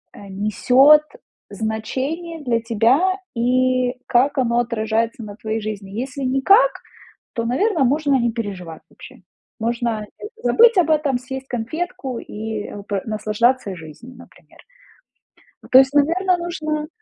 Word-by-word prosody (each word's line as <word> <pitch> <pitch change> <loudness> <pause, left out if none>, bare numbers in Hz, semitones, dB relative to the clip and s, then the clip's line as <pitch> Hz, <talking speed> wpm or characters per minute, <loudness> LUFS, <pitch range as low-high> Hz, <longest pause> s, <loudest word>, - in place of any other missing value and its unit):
э, - - -14
несёт 250 +9 +4 0.5
значение 275 +9 -4
для 235 -3 +1
тебя, 235 - +2 0.2
и 255 +1 +1
как 270 +3 +2
оно 235 -2 +1
отражается 230 -1 -1
на 205 -1 -9
твоей 220 0 -4
жизни. 205 -2 -6
Если 265 +5 -5
никак, 390 - +4 0.6
то, 230 - -3
наверно, 320 - +1
можно 280 0 +2
не 235 0 +1
переживать 195 -8 -6
вообще. - - -15 0.4
Можно 230 -1 -2 0.4
забыть 465 0 +5
об 340 -4 +3
этом, 295 -4 +2
съесть 265 +1 -6
конфетку 255 +1 -4
и 215 0 -6 0.2
пр 200 -2 -2
наслаждаться 215 +1 0
жизнью, 170 +10 -12
например. - - -18 1.1
То 255 - +9
есть, 265 +1 +5
наверно, 355 +6 +2
нужно 310 -3 -3
250 Hz, 125 wpm, -20 LUFS, 220-290 Hz, 1.1 s, То